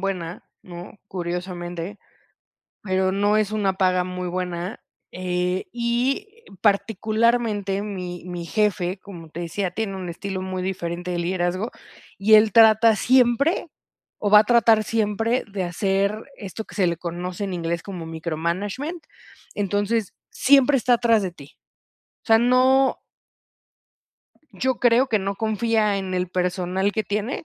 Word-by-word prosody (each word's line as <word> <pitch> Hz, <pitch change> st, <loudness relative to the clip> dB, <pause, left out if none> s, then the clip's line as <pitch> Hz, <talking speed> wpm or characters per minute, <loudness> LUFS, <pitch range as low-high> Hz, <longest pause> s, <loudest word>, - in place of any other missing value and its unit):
buena, 180 Hz, -3 st, -4 dB, 0.2 s
¿no?, 175 Hz, +3 st, -10 dB
curiosamente, 175 Hz, +1 st, -5 dB, 0.8 s
pero 190 Hz, -1 st, 0 dB
no 205 Hz, +2 st, +2 dB
es 215 Hz, -1 st, 0 dB
una 205 Hz, -3 st, 0 dB
paga 185 Hz, -1 st, +2 dB
muy 180 Hz, 0 st, -5 dB
buena, 180 Hz, +1 st, -4 dB, 0.3 s
eh, 180 Hz, 0 st, -2 dB
y 245 Hz, -, 0 dB, 0.3 s
particularmente, 215 Hz, -1 st, +1 dB
mi 180 Hz, -4 st, -6 dB
mi 175 Hz, -1 st, -6 dB
jefe, 190 Hz, -1 st, 0 dB
como 170 Hz, -5 st, -11 dB
te 165 Hz, -, -8 dB
decía, 180 Hz, +2 st, -3 dB
tiene 195 Hz, +1 st, -3 dB
un 185 Hz, -2 st, -5 dB
estilo 190 Hz, +2 st, -5 dB
muy 185 Hz, -1 st, -4 dB
diferente 180 Hz, -1 st, -4 dB
de 175 Hz, -, -2 dB
liderazgo, 180 Hz, +4 st, -1 dB, 0.5 s
y 210 Hz, +3 st, +3 dB
él 215 Hz, 0 st, +5 dB
trata 220 Hz, +1 st, +6 dB
siempre, 255 Hz, -, +3 dB, 0.5 s
o 205 Hz, -, -1 dB
va 210 Hz, -, +9 dB
a 215 Hz, -, +4 dB
tratar 230 Hz, -1 st, +4 dB
siempre, 225 Hz, +2 st, 0 dB
de 195 Hz, -2 st, -2 dB
hacer 195 Hz, +4 st, 0 dB
esto 205 Hz, +1 st, -7 dB
que -, -, -14 dB
se 190 Hz, -4 st, +2 dB
le 170 Hz, -, -1 dB
conoce 175 Hz, +3 st, -5 dB
en 190 Hz, -, -4 dB
inglés 170 Hz, -1 st, -2 dB
como 180 Hz, -5 st, -7 dB
micromanagement. 175 Hz, -, -3 dB, 0.5 s
Entonces, 205 Hz, +1 st, -1 dB, 0.2 s
siempre 275 Hz, +1 st, +4 dB
está 245 Hz, 0 st, +2 dB
atrás 230 Hz, -2 st, +3 dB
de 185 Hz, -3 st, -3 dB
ti. 145 Hz, -4 st, -15 dB, 0.7 s
O -, -, -27 dB
sea, 225 Hz, -1 st, +6 dB
no 255 Hz, +3 st, +3 dB, 1.5 s
Yo 260 Hz, -1 st, -1 dB
creo 245 Hz, +2 st, +4 dB
que 220 Hz, -3 st, +2 dB
no 195 Hz, 0 st, -3 dB
confía 220 Hz, -1 st, +1 dB
en 190 Hz, -1 st, -4 dB
el 180 Hz, 0 st, -1 dB
personal 180 Hz, +2 st, -1 dB
que 220 Hz, -, -1 dB
tiene, 210 Hz, +9 st, -3 dB
195 Hz, 140 wpm, -23 LUFS, 180-220 Hz, 1.5 s, va